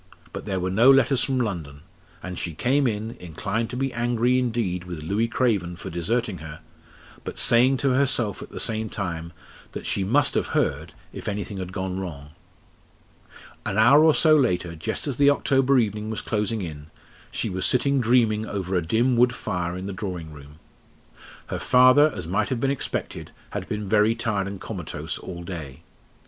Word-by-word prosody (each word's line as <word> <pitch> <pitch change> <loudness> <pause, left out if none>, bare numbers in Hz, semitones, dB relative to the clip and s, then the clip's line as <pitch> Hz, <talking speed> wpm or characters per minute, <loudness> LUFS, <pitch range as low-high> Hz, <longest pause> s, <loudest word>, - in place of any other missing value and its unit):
But - - -6
there 95 -2 -1
were 90 +1 -2
no 115 +7 +5
letters 135 -1 +5
from 135 -2 0
London, 80 - -4 0.4
and 90 -1 -5
she 85 -3 -4
came 135 - +2
in, 110 0 -2
inclined 90 +7 -3
to 125 - -5
be 135 0 -1
angry 120 +1 +1
indeed 110 -8 -1
with 85 -4 -7
Louis 105 +8 0
Craven 105 -8 0
for 85 - -8
deserting 100 +3 -1
her, 80 +1 -9 0.6
but - - -7
saying 125 +3 +4
to 135 - +4
herself 130 -6 +1
at - - -9
the - - -8
same 110 -1 -1
time 85 -5 -4 0.4
that - - -6
she 100 - 0
must 140 +9 +2
have - - 0
heard - - -1 0.2
if - - -8
anything 105 0 -3
had 95 -1 -5
gone 95 -1 -3
wrong. 75 -6 -7 1.3
An 100 - -3
hour 135 +8 +7
or 160 -1 +5
so 155 -1 +5
later, 90 - +1
just 80 - -4
as 140 -4 -3
the 140 0 +5
October 135 -1 +3
evening 105 -2 0
was 110 - -3
closing 105 -1 -1
in, 75 -3 -7 0.4
she - - -2
was 95 0 -2
sitting 140 +1 +2
dreaming 110 -2 +2
over 95 -2 -4
a 90 - +2
dim 115 +9 +1
wood 125 +1 +4
fire 90 -4 -3
in 95 - -6
the 100 - -4
drawing 90 -5 -5
room. 75 0 -13 0.9
Her - - -3
father, 130 +4 +6
as 90 - -5
might 90 +4 0
have 130 -3 -1
been 135 +2 +1
expected, 140 - -4 0.2
had - - -5
been 105 -1 -3
very 105 +2 +3
tired 105 -4 -1
and 100 -1 -6
comatose 75 -3 -5
all 85 -1 -8
day. 80 -7 -7
105 Hz, 185 wpm, -24 LUFS, 90-125 Hz, 1.3 s, hour